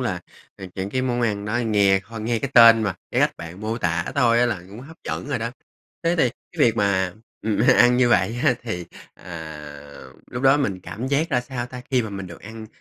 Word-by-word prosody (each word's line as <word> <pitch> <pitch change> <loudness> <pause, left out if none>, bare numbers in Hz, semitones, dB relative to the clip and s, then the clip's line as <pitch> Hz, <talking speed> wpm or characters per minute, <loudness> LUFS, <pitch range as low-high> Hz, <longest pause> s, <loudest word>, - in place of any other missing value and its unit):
là - - -2 0.5
những 95 +1 -4
cái 130 +2 -1
món 125 -1 -1
ăn 105 -3 -1
đó 105 +3 -1
nghe 100 -4 +3
ho 115 +1 -9
nghe 115 +2 -1
cái 135 +3 -4
tên 115 -1 +8
mà 100 -4 -1 0.2
cái - - +1
cách - - +2
bạn 85 +3 -9
mô 110 +2 -3
tả 85 -5 0
thôi 120 -4 +4
á 125 - +4
là 105 -8 -3
cũng 105 +5 -10
hấp 160 +5 -12
dẫn - - -4
rồi 140 -3 -1
đó. 115 +1 -3 0.5
Thế 170 +1 +1
thì 140 -7 +3 0.2
cái - - -15
việc 115 -1 +2
mà, 95 -3 +1 0.3
ừm, 110 -1 0 0.2
ăn 120 0 +6
như 125 -1 +4
vậy 120 0 +2
á, 135 -5 +4
thì, 100 -7 -4 0.3
à, 75 -4 -10 0.3
lúc 125 - -5
đó 135 +1 +6
mình 100 -10 -1
cảm 120 +8 -6
giác 145 +4 +1
ra 125 - +2
sao 125 -1 -5
ta? 125 0 -9
Khi 130 -2 +3
mà 110 - -6
mình 95 -1 -6
được 85 -2 -11
ăn, 110 +1 -9
115 Hz, 235 wpm, -23 LUFS, 95-125 Hz, 0.5 s, tên